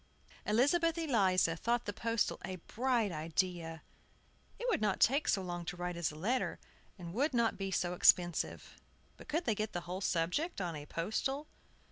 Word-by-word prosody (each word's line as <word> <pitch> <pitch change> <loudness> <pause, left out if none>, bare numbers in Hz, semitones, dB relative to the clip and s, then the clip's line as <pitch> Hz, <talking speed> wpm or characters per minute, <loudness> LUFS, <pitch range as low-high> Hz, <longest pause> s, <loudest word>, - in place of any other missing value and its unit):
Elizabeth 320 +10 +3
Eliza 195 - +2
thought 235 +7 0
the 205 - -3
postal 230 +1 0
a 185 - -4
bright 230 +3 0
idea. 165 0 -2 0.7
It 485 - -4
would 470 - +1
not 210 -3 +1
take 280 +5 +4
so 195 - +2
long 175 -1 -4
to 175 - -5
write 180 0 -3
as 170 -1 0
a - - -11
letter, 230 +11 -1 0.4
and 170 -2 -8
would 275 +5 +1
not 235 -1 +2
be 195 -1 -3
so 180 -1 0
expensive. 175 -1 +3 0.4
But - - -14
could 325 +3 -1
they 225 - +2
get 215 +1 -3
the 175 - -2
whole 180 +2 -5
subject 185 - 0
on 175 -4 -2
a 145 0 -8
postal? 265 - -2
195 Hz, 175 wpm, -34 LUFS, 175-245 Hz, 0.7 s, take